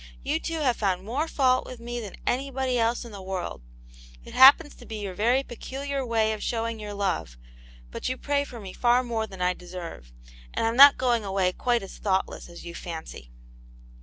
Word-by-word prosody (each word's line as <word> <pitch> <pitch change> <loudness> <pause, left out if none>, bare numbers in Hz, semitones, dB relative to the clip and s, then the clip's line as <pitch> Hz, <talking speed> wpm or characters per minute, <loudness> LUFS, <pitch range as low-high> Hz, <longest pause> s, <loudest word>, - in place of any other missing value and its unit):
You 295 +4 0
two 330 -1 -3
have 250 -5 +2
found 190 -2 -1
more 275 +9 -1
fault 255 -4 +2
with 255 - -9
me 240 +1 -5
than 210 -5 -7
anybody 265 -1 0
else 230 +2 0
in 235 - -10
the 200 -2 -9
world; 190 - -5 0.6
it - - -12
happens 285 +3 +7
to 245 - -14
be 220 - -6
your 205 -3 -5
very 240 +7 +2
pecu 260 +1 -8
liar 280 -1 -2
way 225 -3 +1
of 215 - -6
showing 230 -1 -2
your 210 -1 -6
love; 190 - -2 0.5
but - - -3
you 255 - -2
pray 285 +1 0
for 245 -4 -9
me 195 -3 -8
far 245 +1 +3
more 225 -2 -2
than 190 -3 -6
I 180 0 +2
deserve 175 - -9 0.2
— - - -21
and - - 0
I'm 225 +1 0
not 280 +2 +9
going 245 -3 +2
Bway 190 -2 0
quite 240 -3 +1
as 195 - -10
thoughtless 190 -3 -1
as 170 - -11
you 170 - -7
fancy." 160 - -8
230 Hz, 210 wpm, -26 LUFS, 190-255 Hz, 0.6 s, not